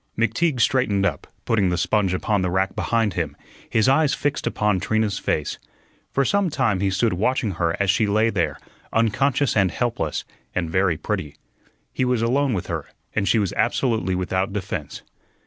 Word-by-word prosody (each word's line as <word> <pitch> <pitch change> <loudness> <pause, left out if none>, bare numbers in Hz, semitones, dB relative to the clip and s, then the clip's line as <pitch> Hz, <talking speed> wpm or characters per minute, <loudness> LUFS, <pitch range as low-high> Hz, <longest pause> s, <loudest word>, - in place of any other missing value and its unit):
McTeague 125 +6 +1
straightened 110 -6 +2
up, - - -2 0.2
putting 100 -5 +2
the 90 - 0
sponge 95 0 +1
upon 100 +2 0
the 90 - 0
rack 95 +2 0
behind 115 -4 +1
him, - - -3 0.3
his 110 +2 +2
eyes 145 +2 +3
fixed 145 +1 -1
upon 105 -3 +1
Trina's 110 +1 0
face. 75 - -2 0.5
For 135 - +1
some 200 +1 +2
time 125 -10 +1
he 100 +1 +1
stood 105 +3 +1
watching 110 +3 0
her 85 -2 -1
as 100 -1 +3
she 110 +1 +1
lay 110 +3 +2
there, 85 -6 -1 0.3
unconscious 125 +5 +2
and 95 -3 +4
helpless, 100 -6 -2 0.3
and 85 -3 -1
very 95 -2 +2
pretty. 75 -1 -3 0.6
He - - 0
was 125 -2 +1
alone 130 +1 +2
with 90 -1 -3
her, 80 -4 -4 0.3
and 100 -2 0
she 100 - +4
was 100 -4 0
absolutely 110 -4 +1
without 95 +2 -1
defense. 100 -2 -5
105 Hz, 175 wpm, -23 LUFS, 95-120 Hz, 0.6 s, and